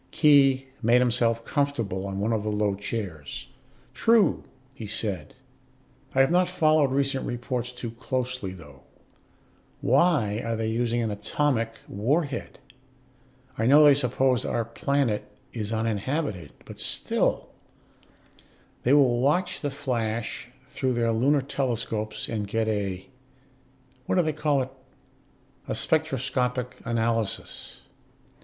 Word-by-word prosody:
Khee 135 -3 +5 0.2
made 120 +1 +5
himself 115 -2 +1
comfortable 115 -10 -1
on 95 0 -4
one 110 +3 0
of 110 - 0
the 105 - -2
low 105 -1 +1
chairs. 95 -7 -5 0.4
"True," 225 -2 +3 0.3
he 115 -5 -8
said. 100 -7 -4 0.8
"I 135 - +6
have 135 - +3
not 180 0 +3
followed 155 -5 +3
recent 135 0 0
reports 120 0 -3
too 120 -2 -6
closely, 125 -3 -3
though. 75 -7 -13 1.0
Why 130 - +2
are 115 0 -1
they 110 0 -1
using 120 +1 0
an 110 - -1
atomic 115 +2 0
warhead? 140 - -1 1.0
I 110 - +2
know 145 +3 +7
they 145 - +8
suppose 130 -2 +1
our 115 - -1
planet 125 -2 -1 0.2
is 110 -2 -4
uninhabited, 110 - -2
but - - -11
still - - 0 0.6
" - - -31
"They 125 - +4
will 130 -5 +5
watch 155 +7 +1
the 145 - -1
flash 120 -4 -3 0.2
through 130 -1 -2
their 115 -1 +1
lunar 135 +5 +2
telescopes 120 -5 -2
and 105 -2 -3
get 110 +2 0
a 100 -4 -2 1.0
what - - +1
do 180 - +4
they 155 -1 0
call 145 -3 +1
it? 130 - -9 1.0
a - - -2
spectroscopic 130 -5 0
analysis. 115 -2 -2
120 Hz, 125 wpm, -26 LUFS, 110-140 Hz, 1.0 s, they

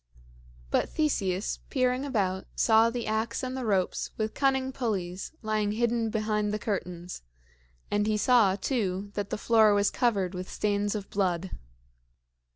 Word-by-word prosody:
But - - +1
Theseus, 200 - 0
peering 255 0 +1
about, 190 -8 -1
saw 225 0 +5
the 235 0 -4
ax 220 +3 -1
and 255 0 -3
the 255 -3 -3
ropes 190 -3 0
with 215 0 -2
cunning 265 -1 +1
pulleys 195 -8 -3
lying 215 -1 0
hidden 230 0 +1
behind 215 -1 0
the 210 - -1
curtains; 180 -4 -4 0.7
and 205 0 +1
he 215 -1 +1
saw, 215 -4 +4
too, 200 -4 -2
that 200 -1 -3
the - - -2
floor 220 -1 +4
was 205 0 +2
covered 200 -7 +1
with 185 0 -6
stains 205 0 0
of 205 -2 -6
blood. 185 -2 0
210 Hz, 150 wpm, -28 LUFS, 195-235 Hz, 0.7 s, saw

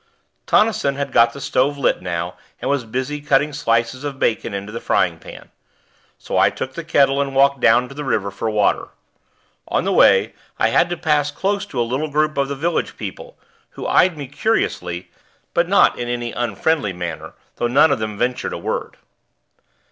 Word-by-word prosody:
Tonnison 210 -11 +2
had 140 -1 -3
got 115 -1 +5
the 140 - -10
stove 140 +1 0
lit 140 - +1
now 90 -1 -3 0.3
and - - -1
was 140 -4 -1
busy 130 +6 -3
cutting 145 +1 +2
slices 115 -1 0
of 145 -2 -4
bacon 115 -2 0
into 100 +1 -5
the 115 - -5
frying - - +1
pan; - - -12 0.7
so - - -2
I - - +5
took 130 - -6
the 170 - -6
kettle 140 -3 +3
and 135 -1 -3
walked 140 0 +4
down 125 0 +4
to 140 - -11
the 150 +1 -6
river 100 -7 -1
for 110 +3 -3
water. 105 -2 +1 0.8
On - - 0
the - - 0
way, - - +5 0.2
I 110 - +2
had 170 +9 +3
to 175 - -3
pass 150 -2 +1
close 200 +5 -2
to 130 - -5
a - - +3
little 135 +6 -2
group 155 +1 +1
of 140 -1 0
the 140 - -4
village 165 +4 -2
people, - - -8 0.4
who - - -6
eyed 180 -3 +3
me 145 - -5
curiously, 90 - -2 0.4
but 170 0 +2
not 200 - +4
in 120 - -3
any 120 -1 -3
unfriendly 120 - -1
manner, 85 -3 -6 0.2
though 120 - 0
none 140 +5 +4
of 140 - +1
them 110 -1 -4
ventured 125 +3 -1
a - - -4
word. - - -4
135 Hz, 195 wpm, -20 LUFS, 115-150 Hz, 0.8 s, got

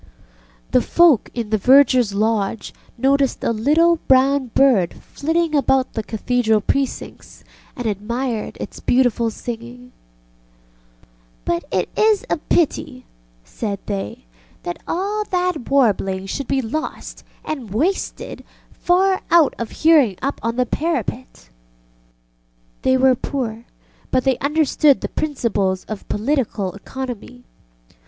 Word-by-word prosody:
ŌĆØ - - -29
The - - +4
folk 340 -9 +4
in 230 -3 -4
the 215 - +2
vergerŌĆÖs 255 -3 +5
lodge 215 0 -1 0.2
noticed 270 +1 +1
a - - +1
little 310 +9 +3
brown 265 +1 +4
bird 235 -8 +3
flitting 325 +2 -2
about 270 -2 +2
the 220 - -2
Cathedral 220 0 0
precincts, 270 +6 -3 0.3
and 245 - -6
admired 225 +3 -3
its - - -7
beautiful 245 -2 +2
singing. 240 +2 -8 1.5
ŌĆ£But 170 - 0
it 185 - 0
is 430 -2 +3
a - - +2
pity, 290 -5 -1 0.4
ŌĆØ - - -32
said 205 -4 -4
they, 195 - -5 0.4
ŌĆ£that 175 - -4
all 405 +5 -1
that 360 - -2
warbling 200 -8 +2
should 255 +7 -4
be 270 -1 0
lost 310 +8 -5 0.2
and 270 -8 -5
wasted 320 - -2 0.3
far 375 +2 +2
out 335 -4 +5
of 235 - -3
hearing 300 - +4
up 275 +1 -3
on 230 +1 -2
the 250 0 +1
parapet. 290 -2 -2
ŌĆØ - - -21 1.3
They 260 0 +3
were 260 0 +5
poor, 240 -3 -4 0.4
but 255 -1 +1
they 265 -2 +1
understood 295 -1 +2
the - - -3
principles 210 -11 -1
of 215 -2 -8
political 215 -5 -1
economy. 245 +2 -7
250 Hz, 125 wpm, -20 LUFS, 215-285 Hz, 1.5 s, vergerŌĆÖs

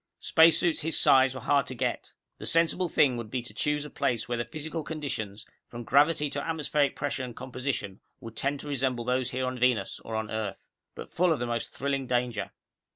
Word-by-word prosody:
Spacesuits 165 +1 +4
his 160 0 0
size 130 0 +5
were 130 - -6
hard 140 +2 +2
to 130 - -5
get. - - -2 0.3
The - - -4
sensible 170 +2 +2
thing 135 -5 +3
would 115 -2 -6
be 125 +1 -3
to 120 - -11
choose 150 0 -1
a - - -7
place 115 -3 -1
where 120 -1 -2
the 120 - -1
physical 155 +1 -5
conditions, 120 -10 -5 0.2
from 120 0 -8
gravity 145 +4 +3
to 140 - -2
atmospheric 150 -3 0
pressure 145 -2 -2
and 120 -2 -7
composition 130 -6 -4 0.2
would 115 -1 -10
tend 140 +4 -1
to - - -9
resemble 130 -4 -1
those 125 0 0
here 130 +1 -2
on 130 0 -3
Venus 120 -5 +1
or 110 - -6
on 110 -1 -3
Earth. 110 -3 -4 0.3
But - - -9
full 180 0 +2
of 160 - +2
the 120 - -2
most 120 -1 -2
thrilling 135 -1 -2
danger. 120 -3 -1
130 Hz, 210 wpm, -28 LUFS, 120-150 Hz, 0.3 s, size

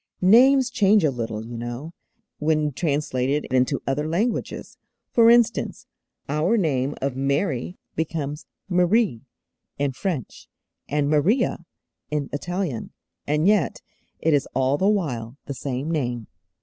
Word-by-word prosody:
Names 260 +1 +6
change 210 -3 +4
a 150 - +3
little, 115 -3 -4
you 120 +1 -8
know, 120 +7 -6 0.5
when 150 -1 +1
translated 140 -1 -1
into 130 +2 +1
other 145 +3 -1
languages. 215 +8 -2 0.3
For 230 -1 +6
instance, 235 -1 +2 0.4
our 155 +10 +1
name 145 - 0
of 135 -2 -1
Mary 140 +3 -1 0.2
becomes 155 -2 -3 0.2
'Marie' 180 - +2 0.5
in 140 -1 0
French, 150 - -5 0.4
and 145 0 +1
'Maria' 170 - +2 0.4
in 150 -2 -2
Italian, 170 - -3 0.4
and 150 +2 +1
yet 200 -7 +2 0.3
it 160 - +1
is 145 -1 +2
all 135 +2 +2
the 195 - +3
while 135 - -2
the 140 - -4
same 135 +3 -3
name. 120 -7 -2
150 Hz, 125 wpm, -24 LUFS, 135-185 Hz, 0.5 s, Names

